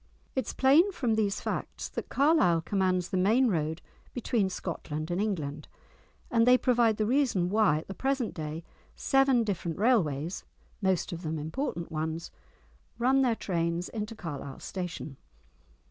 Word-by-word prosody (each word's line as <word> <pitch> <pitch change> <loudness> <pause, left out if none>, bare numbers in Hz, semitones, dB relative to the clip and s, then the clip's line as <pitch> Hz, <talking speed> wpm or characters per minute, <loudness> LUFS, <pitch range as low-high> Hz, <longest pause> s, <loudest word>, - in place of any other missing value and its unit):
It 260 -4 -1
is - - -4
plain 300 +9 +5
from 245 - 0
these 210 -2 0
facts - - -4
that - - -6
Carlisle 275 - +3
commands 185 0 0
the 190 - -1
main 225 +7 +4
road 160 -3 -1 0.3
between 230 -5 0
Scotland 155 -3 -5
and 175 +3 0
England, 155 -8 -3 0.6
and 230 0 +3
they 250 0 +7
provide 240 -4 +3
the 215 - +1
reason 235 -8 +2
why 205 -6 +3
at 155 - -7
the 195 - -5
present 265 0 -1
day 155 +1 -5 0.3
seven 270 -3 +3
different 180 -6 -3
railways, 180 - +1 0.4
most 190 -3 +1
of 170 - -6
them 160 -2 -3
important 170 - -4
ones, 160 +1 -3 0.7
run 260 +3 +3
their 245 -3 +2
trains 170 -3 -2
into 220 0 -5
Carlisle 145 -7 -7
station. 180 -6 -5
195 Hz, 150 wpm, -29 LUFS, 165-240 Hz, 0.7 s, they